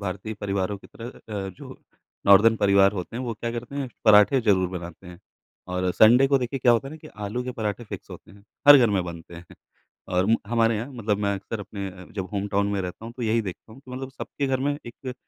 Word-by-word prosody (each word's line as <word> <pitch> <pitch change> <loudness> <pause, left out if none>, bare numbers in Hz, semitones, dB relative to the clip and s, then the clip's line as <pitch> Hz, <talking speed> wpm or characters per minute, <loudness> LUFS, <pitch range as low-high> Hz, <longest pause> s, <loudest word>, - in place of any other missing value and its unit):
भारतीय 100 +2 -5
परिवारों 100 0 -2
की - - -16
तरह 115 +1 -9 0.4
अ, - - -5
जो 90 - -12 0.5
नॉर्दर्न 105 +3 +7
परिवार 100 -1 +4
होते 90 +3 -6
हैं 125 - -3
वो 120 -3 -3
क्या 115 +2 -4
करते 120 +3 -6
हैं, 135 -3 -3 0.2
पराठे 105 +5 +6
ज़रूर 95 -5 +2
बनाते 85 +1 -11
हैं। 90 -1 -11 0.5
और 90 0 0
संडे 120 +5 +6
को 140 0 +3
देखिए 125 +2 -3
क्या 125 -1 +4
होता 125 +4 0
है - - -10
ना - - -9
कि 155 - -13 0.2
आलू 120 +5 -3
के 125 - -4
पराठे 110 +1 -3
फ़िक्स - - -9
होते - - -12
हैं 100 0 -17 0.3
हर 145 - +12
घर 120 -4 +4
में 95 -3 +1
बनते 85 0 -9
हैं। 85 +1 -10 0.7
और 90 +2 +2 0.2
हमारे 115 0 +2
यहाँ 115 +6 -5
मतलब 110 -4 -1
मैं 100 -1 0
अक्सर 105 +2 -6
अपने 100 -1 -6 0.3
जब 95 -3 -4
होमटाउन 100 0 0
में 100 - -1
रहता 90 +4 -7
हूँ 115 - -7
तो 125 - -5
यही 115 0 +1
देखता 100 +3 -8
हूँ। 130 - -14
मतलब 130 +1 -6
सबके 140 +2 -5
घर 130 -1 0
में 145 +1 -1
एक 125 +2 -8
110 Hz, 230 wpm, -25 LUFS, 100-120 Hz, 0.7 s, हर